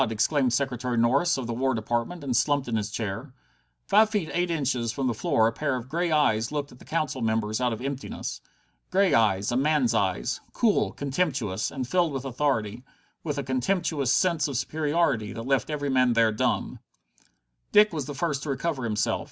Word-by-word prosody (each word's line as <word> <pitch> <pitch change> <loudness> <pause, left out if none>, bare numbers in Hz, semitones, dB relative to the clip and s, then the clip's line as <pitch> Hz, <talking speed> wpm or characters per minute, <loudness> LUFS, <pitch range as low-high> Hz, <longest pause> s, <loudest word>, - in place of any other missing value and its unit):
exclaimed 125 +4 +1
Secretary 125 -1 -1
Norris, 135 +9 +3
of 130 - -4
the 120 - -3
War 130 +2 0
Department, 120 +9 -2
and 130 -3 -1
slumped 145 +2 +2
in 115 - -1
his 105 -1 -1
chair. 110 +5 -5 0.5
Five 215 - +5
feet 205 -7 -2
eight 175 0 0
inches 130 -8 -1
from 135 +4 -3
the 125 - +1
floor 110 0 +2
a 115 - +3
pair 140 +2 -1
of 125 0 -6
grey 170 +3 -1
eyes 115 -7 +2
looked 145 -1 -3
at 125 - -15
the - - -15
Council 155 -5 -2
members 110 0 0
out 125 -1 +2
of 115 +1 -4
emptiness. 135 0 -5 0.5
Grey 195 0 +3
eyes, 105 -2 +2
a - - 0
man's 135 -3 +2
eyes, 95 - 0
cool, 220 -4 +2
contemptuous, 135 - -1
and 130 -3 -4
filled 175 -1 +1
with 135 0 -4
authority, 125 -4 -1 0.4
with 150 -3 -3
a 140 - -1
contemptuous 140 +1 0
sense 165 +2 +2
of 140 -4 -3
superiority 150 -7 0
that 115 - -6
left 135 +4 0
every 145 -2 -2
man 130 -2 +3
there 115 -1 +4
dumb. 105 - -1 0.9
Dick 210 -2 +6
was 150 -5 -3
the 145 - -6
first 145 -2 -1
to 150 - -5
recover 140 0 -2
himself. 105 -2 0
130 Hz, 195 wpm, -26 LUFS, 115-150 Hz, 0.9 s, Dick